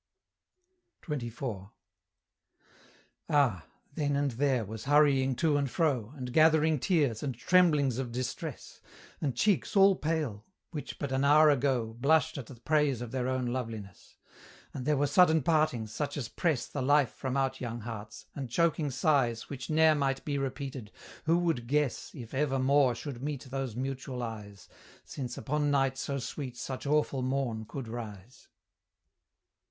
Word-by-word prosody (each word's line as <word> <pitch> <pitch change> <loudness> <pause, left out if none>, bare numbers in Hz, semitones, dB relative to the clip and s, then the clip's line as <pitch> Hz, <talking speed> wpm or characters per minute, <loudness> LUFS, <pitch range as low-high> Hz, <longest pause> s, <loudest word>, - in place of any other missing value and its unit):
XXIV. 120 - -5 1.6
Ah! 125 - +2 0.3
then 145 -2 0
and 140 -1 +1
there 130 -1 +1
was 110 +2 -7
hurrying 140 -2 +4
to 155 +1 +2
and 140 -2 0
fro, 130 - 0
And 125 -3 -6
gathering 155 0 +4
tears, 140 - +1
and 135 -4 -3
tremblings 150 -4 +3
of 125 -3 -3
distress, 130 +4 -5 0.4
And 140 -6 -1
cheeks 205 - +1
all 195 0 +6
pale, 150 - -2 0.3
which 150 -4 -6
but 140 -2 -4
an 135 +1 +1
hour 150 +2 +6
ago 125 -5 0
Blushed 155 +2 +2
at 120 - -8
the 130 - -10
praise 145 +1 +1
of 115 - -8
their 130 -1 -1
own 130 -1 -1
loveliness; 115 -6 -6 0.6
And 130 -1 -5
there 150 -1 +3
were 145 - +2
sudden 160 +1 +4
partings, 140 -9 +1
such 145 +2 -3
as 125 -6 -4
press 155 -8 0
The 145 - -5
life 140 -2 +3
from 130 0 -3
out 135 -1 -1
young 120 -1 -4
hearts, 110 -1 -8
and 135 -4 -5
choking 160 +1 +1
sighs 130 -4 +1
Which 135 -2 -6
ne'er 160 0 +5
might 135 -2 -1
be 145 -2 -1
repeated: 135 -4 -5 0.3
who 165 +2 +4
would 165 -9 0
guess 145 -1 0
If 120 -4 -9
ever 135 0 +1
more 135 -1 +3
should 130 -1 -7
meet 145 -1 -4
those 130 -3 -4
mutual 130 -1 -4
eyes, 105 -4 -8 0.4
Since 125 -4 -6
upon 145 +5 -1
night 135 -2 +2
so 140 +1 -3
sweet 130 0 -5
such 130 +2 -5
awful 150 -2 +1
morn 125 -4 -1
could 135 -1 -6
rise! 110 -1 -8
135 Hz, 155 wpm, -30 LUFS, 120-150 Hz, 1.6 s, all